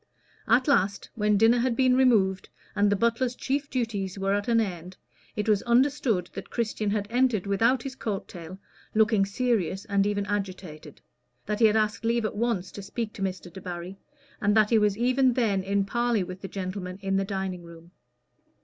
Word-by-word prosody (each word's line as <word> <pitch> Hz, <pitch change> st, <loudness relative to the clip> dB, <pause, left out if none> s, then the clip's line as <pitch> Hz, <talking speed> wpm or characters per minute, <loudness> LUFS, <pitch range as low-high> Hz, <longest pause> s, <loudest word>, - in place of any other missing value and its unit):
At 245 Hz, +4 st, +3 dB
last, 200 Hz, -8 st, +1 dB
when 210 Hz, -1 st, +2 dB
dinner 225 Hz, +3 st, +5 dB
had 245 Hz, 0 st, +1 dB
been 255 Hz, 0 st, +3 dB
removed, 210 Hz, -8 st, +3 dB, 0.3 s
and 205 Hz, 0 st, +3 dB
the -, -, +3 dB
butler's 235 Hz, +4 st, 0 dB
chief 275 Hz, +2 st, -2 dB
duties 210 Hz, -7 st, -2 dB
were 195 Hz, 0 st, 0 dB
at 205 Hz, 0 st, -1 dB
an 230 Hz, -1 st, +3 dB
end, 185 Hz, -3 st, -4 dB, 0.4 s
it 210 Hz, -1 st, -2 dB
was 210 Hz, -2 st, +3 dB
understood 240 Hz, -6 st, +2 dB
that -, -, -8 dB
Christian 220 Hz, -3 st, -2 dB
had 205 Hz, 0 st, -1 dB
entered 245 Hz, -5 st, +2 dB
without 225 Hz, +5 st, +2 dB
his 270 Hz, -, -5 dB
coat 210 Hz, -6 st, -4 dB
tail, 175 Hz, +1 st, -9 dB, 0.4 s
looking 215 Hz, -2 st, +3 dB
serious 200 Hz, -4 st, -1 dB
and 200 Hz, 0 st, +1 dB
even 205 Hz, -1 st, -1 dB
agitated; 185 Hz, -7 st, -5 dB, 0.4 s
that 210 Hz, 0 st, -2 dB
he 225 Hz, -, +7 dB
had 215 Hz, -, +1 dB
asked 215 Hz, 0 st, 0 dB
leave 230 Hz, 0 st, +1 dB
at 215 Hz, -, -3 dB
once 210 Hz, -5 st, -1 dB
to 200 Hz, -, -8 dB
speak 215 Hz, +2 st, -5 dB
to -, -, -10 dB
Mr. 185 Hz, -2 st, -4 dB
Debarry, 180 Hz, 0 st, -7 dB, 0.4 s
and 205 Hz, +1 st, +2 dB
that 215 Hz, 0 st, +4 dB
he 225 Hz, -, +5 dB
was 210 Hz, -1 st, +1 dB
even 255 Hz, +2 st, +3 dB
then 215 Hz, -6 st, +1 dB
in 200 Hz, +1 st, 0 dB
parley 235 Hz, -1 st, 0 dB
with 185 Hz, +1 st, -8 dB
the 195 Hz, -, -5 dB
gentleman 185 Hz, -1 st, -5 dB
in 195 Hz, 0 st, 0 dB
the 195 Hz, -, +1 dB
dining 190 Hz, -2 st, -4 dB
room. 170 Hz, 0 st, -14 dB
205 Hz, 190 wpm, -26 LUFS, 190-235 Hz, 0.4 s, he